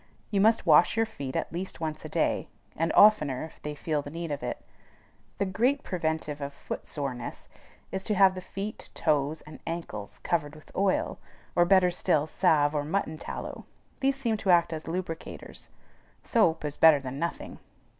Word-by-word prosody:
You 200 Hz, -2 st, +2 dB
must 220 Hz, 0 st, +4 dB
wash 170 Hz, +6 st, +5 dB
your 225 Hz, -, +4 dB
feet 140 Hz, -12 st, -7 dB
at -, -, -2 dB
least 185 Hz, +1 st, -5 dB
once 155 Hz, -1 st, -4 dB
a -, -, -7 dB
day, -, -, 0 dB, 0.3 s
and 165 Hz, +1 st, 0 dB
oftener 150 Hz, -12 st, +5 dB
if 160 Hz, -, -15 dB
they 150 Hz, 0 st, -5 dB
feel 150 Hz, 0 st, -1 dB
the 145 Hz, -, -8 dB
need 165 Hz, +1 st, -5 dB
of 145 Hz, -, -3 dB
it. -, -, -5 dB, 0.7 s
The 200 Hz, -, +1 dB
great 245 Hz, +9 st, +1 dB
preventive 160 Hz, -4 st, -2 dB
of 140 Hz, 0 st, -5 dB
foot -, -, -6 dB
soreness 135 Hz, -5 st, -5 dB, 0.4 s
is 190 Hz, 0 st, -3 dB
to 210 Hz, -, 0 dB
have 190 Hz, -1 st, +6 dB
the 185 Hz, -, -6 dB
feet, 200 Hz, +3 st, -6 dB
toes, 150 Hz, 0 st, +1 dB
and 155 Hz, -, -12 dB
ankles 165 Hz, -12 st, -5 dB
covered 150 Hz, -3 st, -1 dB
with 155 Hz, -, -16 dB
oil, 195 Hz, 0 st, +1 dB, 0.4 s
or, 175 Hz, -, +5 dB
better 185 Hz, -1 st, +5 dB
still, 175 Hz, -4 st, +1 dB
salve 155 Hz, -3 st, +3 dB
or 145 Hz, -1 st, 0 dB
mutton 160 Hz, -1 st, -2 dB
tallow; -, -, -6 dB, 0.3 s
these 270 Hz, 0 st, +2 dB
seem 235 Hz, -5 st, 0 dB
to 205 Hz, -, -3 dB
act 170 Hz, -2 st, +5 dB
as 155 Hz, -1 st, -6 dB
lubricators. 165 Hz, -1 st, -6 dB, 0.5 s
Soap 170 Hz, -, +2 dB
is 145 Hz, -1 st, -4 dB
better 160 Hz, -3 st, +7 dB
than 135 Hz, 0 st, -6 dB
nothing. 170 Hz, +2 st, -4 dB
165 Hz, 180 wpm, -28 LUFS, 150-190 Hz, 0.7 s, better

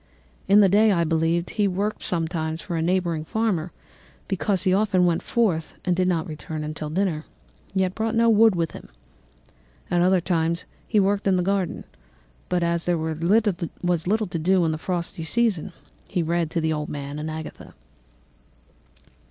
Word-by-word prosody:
In 200 Hz, +2 st, +7 dB
the 200 Hz, -, +6 dB
day, 210 Hz, +3 st, +4 dB
I 170 Hz, -3 st, +2 dB
believe, 165 Hz, +1 st, +1 dB
he 210 Hz, -2 st, 0 dB
worked 200 Hz, +3 st, -2 dB
sometimes 160 Hz, -2 st, -2 dB
for 170 Hz, +2 st, -5 dB
a 165 Hz, -, 0 dB
neighbouring 170 Hz, -2 st, 0 dB
farmer, 185 Hz, -3 st, -1 dB, 0.6 s
because 195 Hz, -1 st, 0 dB
he 185 Hz, -2 st, +3 dB
often 190 Hz, -2 st, +3 dB
went 170 Hz, -2 st, +1 dB
forth 185 Hz, -9 st, 0 dB
and 180 Hz, -1 st, +2 dB
did 185 Hz, +1 st, +1 dB
not 170 Hz, -2 st, 0 dB
return 155 Hz, -1 st, -6 dB
until 150 Hz, 0 st, -5 dB
dinner, 165 Hz, -2 st, -1 dB, 0.5 s
yet 190 Hz, -1 st, +1 dB
brought 225 Hz, +2 st, -2 dB
no 230 Hz, 0 st, +4 dB
wood 225 Hz, -2 st, +5 dB
with 165 Hz, -2 st, -1 dB
him. -, -, -11 dB, 1.0 s
At 175 Hz, -1 st, +3 dB
other 185 Hz, +1 st, +4 dB
times 170 Hz, -1 st, 0 dB, 0.2 s
he 215 Hz, -, +2 dB
worked 200 Hz, +1 st, +1 dB
in 190 Hz, -, +4 dB
the 180 Hz, -, +1 dB
garden, 195 Hz, -1 st, -1 dB, 0.6 s
but 180 Hz, -1 st, +1 dB
as 170 Hz, 0 st, 0 dB
there 175 Hz, -1 st, +1 dB
was 160 Hz, 0 st, -3 dB, 0.9 s
little 215 Hz, +3 st, +1 dB
to 170 Hz, -2 st, -4 dB
do 180 Hz, +2 st, +3 dB
in 160 Hz, -, +1 dB
the 155 Hz, -, -3 dB
frosty 175 Hz, -1 st, -3 dB
season, 200 Hz, 0 st, +1 dB, 0.4 s
he 175 Hz, -, -1 dB
read 170 Hz, 0 st, 0 dB
to 165 Hz, -, -1 dB
the 160 Hz, 0 st, +1 dB
old 150 Hz, -1 st, -3 dB
man 145 Hz, 0 st, -5 dB
and 155 Hz, +1 st, -4 dB
Agatha. 155 Hz, 0 st, -8 dB
175 Hz, 175 wpm, -24 LUFS, 160-195 Hz, 1.0 s, In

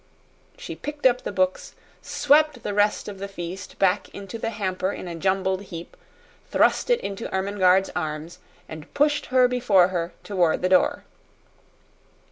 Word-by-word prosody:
She -, -, -7 dB
picked 295 Hz, -1 st, -7 dB
up 250 Hz, -1 st, +4 dB
the -, -, -4 dB
books, 185 Hz, -1 st, -1 dB, 0.3 s
swept 295 Hz, -3 st, +2 dB
the -, -, -3 dB
rest 205 Hz, +1 st, +1 dB
of 200 Hz, -2 st, -7 dB
the 200 Hz, -, -4 dB
feast 185 Hz, -1 st, -7 dB
back 195 Hz, +1 st, +1 dB
into 200 Hz, +3 st, -7 dB
the 225 Hz, -, -2 dB
hamper 190 Hz, -3 st, -2 dB
in 185 Hz, -, -7 dB
a 175 Hz, -, -5 dB
jumbled 190 Hz, +2 st, 0 dB
heap, 170 Hz, -2 st, -9 dB, 0.5 s
thrust -, -, +2 dB
it 485 Hz, -, +4 dB
into 200 Hz, +3 st, -5 dB
Ermengarde's 190 Hz, -1 st, +2 dB
arms, 160 Hz, +1 st, -4 dB, 0.3 s
and 155 Hz, -1 st, -10 dB
pushed 295 Hz, 0 st, +2 dB
her 255 Hz, -1 st, +4 dB
before 205 Hz, -8 st, +3 dB
her 175 Hz, -2 st, -2 dB
toward 180 Hz, -5 st, +1 dB
the 185 Hz, -, +2 dB
door. 185 Hz, -1 st, +3 dB
195 Hz, 155 wpm, -24 LUFS, 180-225 Hz, 0.5 s, up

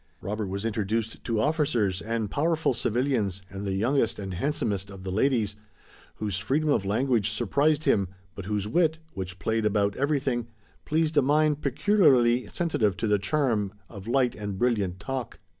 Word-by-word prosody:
Robert 105 Hz, +2 st, -3 dB
was 100 Hz, +3 st, -4 dB
introduced 110 Hz, +1 st, -2 dB
to 115 Hz, -3 st, 0 dB
officers 125 Hz, -, +1 dB
and 115 Hz, -2 st, -2 dB
powerful 160 Hz, -1 st, +1 dB
civilians 115 Hz, -5 st, 0 dB
and 100 Hz, +1 st, -5 dB
the 95 Hz, -, -1 dB
youngest 115 Hz, +4 st, +1 dB
and 95 Hz, -2 st, -5 dB
handsomest 100 Hz, -, -1 dB
of 95 Hz, -2 st, -10 dB
the 95 Hz, -, -4 dB
ladies, 110 Hz, -1 st, +1 dB, 0.6 s
whose 100 Hz, -3 st, -2 dB
freedom 145 Hz, +10 st, 0 dB
of 105 Hz, -, +2 dB
language 115 Hz, +1 st, +1 dB
surprised 145 Hz, +8 st, +1 dB
him, 100 Hz, -9 st, +2 dB, 0.3 s
but 100 Hz, -, -8 dB
whose 105 Hz, 0 st, -2 dB
wit, 160 Hz, +6 st, +2 dB, 0.2 s
which 95 Hz, -1 st, -6 dB
played 110 Hz, +3 st, -1 dB
about 100 Hz, -1 st, +1 dB
everything, 135 Hz, -4 st, 0 dB, 0.4 s
pleased 155 Hz, 0 st, +1 dB
a -, -, +7 dB
mind 150 Hz, +2 st, +2 dB
peculiarly 130 Hz, -, +3 dB
sensitive 110 Hz, -, 0 dB
to -, -, -1 dB
the 105 Hz, -1 st, +2 dB
charm 110 Hz, -5 st, 0 dB, 0.2 s
of 100 Hz, -1 st, -10 dB
light 125 Hz, 0 st, +2 dB
and 100 Hz, -2 st, -5 dB
brilliant 100 Hz, -6 st, 0 dB
talk. 130 Hz, +1 st, -4 dB
115 Hz, 160 wpm, -27 LUFS, 100-140 Hz, 0.6 s, a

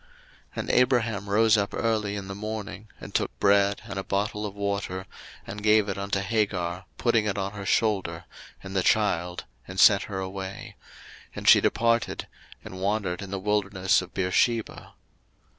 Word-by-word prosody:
01:021:014 -, -, -29 dB, 0.5 s
And -, -, -3 dB
Abraham 115 Hz, -5 st, +2 dB
rose 110 Hz, +1 st, +4 dB
up 100 Hz, 0 st, -1 dB
early 110 Hz, -3 st, 0 dB
in 100 Hz, -1 st, -6 dB
the 95 Hz, -, -5 dB
morning, 105 Hz, 0 st, -6 dB
and -, -, -10 dB
took -, -, -1 dB
bread, 100 Hz, 0 st, +3 dB
and -, -, -5 dB
a -, -, -4 dB
bottle 105 Hz, +2 st, -2 dB
of 100 Hz, -, -9 dB
water, 100 Hz, -2 st, -3 dB, 0.4 s
and 105 Hz, +2 st, -7 dB
gave 105 Hz, 0 st, +4 dB
it 100 Hz, -1 st, -3 dB
unto 100 Hz, 0 st, -1 dB
Hagar, 95 Hz, -4 st, -1 dB
putting 115 Hz, -3 st, +2 dB
it 100 Hz, -, -1 dB
on 100 Hz, 0 st, -2 dB
her 100 Hz, -1 st, -7 dB
shoulder, 95 Hz, -7 st, 0 dB, 0.4 s
and 95 Hz, 0 st, -8 dB
the 95 Hz, -, +3 dB
child, 90 Hz, -4 st, +1 dB, 0.2 s
and 95 Hz, 0 st, -6 dB
sent 100 Hz, +1 st, +6 dB
her 100 Hz, -, -4 dB
away: 95 Hz, 0 st, -6 dB, 0.6 s
and -, -, -6 dB
she -, -, +8 dB
departed, 115 Hz, 0 st, +1 dB, 0.4 s
and 95 Hz, 0 st, -8 dB
wandered 100 Hz, -3 st, -1 dB
in 100 Hz, -, -7 dB
the 100 Hz, -, -3 dB
wilderness 95 Hz, -2 st, +1 dB
of 90 Hz, -, -10 dB
Beersheba. 105 Hz, +5 st, 0 dB
100 Hz, 170 wpm, -26 LUFS, 95-105 Hz, 0.6 s, she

